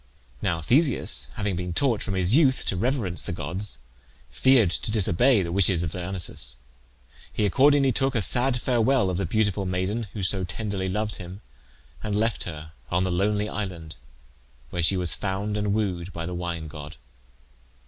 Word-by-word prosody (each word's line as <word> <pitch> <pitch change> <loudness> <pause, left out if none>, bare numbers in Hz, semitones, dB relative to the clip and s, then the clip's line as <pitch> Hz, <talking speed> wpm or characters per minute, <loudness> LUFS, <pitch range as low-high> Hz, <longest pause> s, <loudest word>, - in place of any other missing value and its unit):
Now 80 - -1
Theseus, 125 - +2
having 100 -2 -2
been 90 0 -3
taught 120 -1 +2
from 100 - -2
his 95 +4 +3
youth 140 -4 +4
to - - -1
reverence 110 -4 -1
the - - -5
gods, 90 +6 -5 0.5
feared 120 - +4
to - - -3
disobey 110 +2 +3
the 85 - -4
wishes 90 -2 +3
of 80 - -3
Dionysus. 90 0 -2 0.8
He 105 - 0
accordingly 135 +6 +4
took 135 +3 0
a 115 - +1
sad 125 +2 +2
farewell 120 -4 +2
of 90 - -2
the 100 -2 -1
beautiful 105 0 0
maiden 95 +5 -2
who 105 - -4
so 95 +2 +2
tenderly 95 +1 -3
loved 105 +2 -2
him, 90 +3 -9 0.6
and 105 -2 -2
left 110 +1 0
her 80 -2 -7 0.2
on 90 +1 +1
the 95 - -1
lonely 105 +3 +1
island, 90 -7 -5 0.8
where 90 - -2
she 90 +3 +2
was 90 -2 0
found 100 +2 -2
and 105 -1 0
wooed 95 -4 -1
by 85 -1 -5
the 90 - -5
wine 85 -2 -4
god. 75 -1 -9
95 Hz, 170 wpm, -25 LUFS, 90-110 Hz, 0.8 s, youth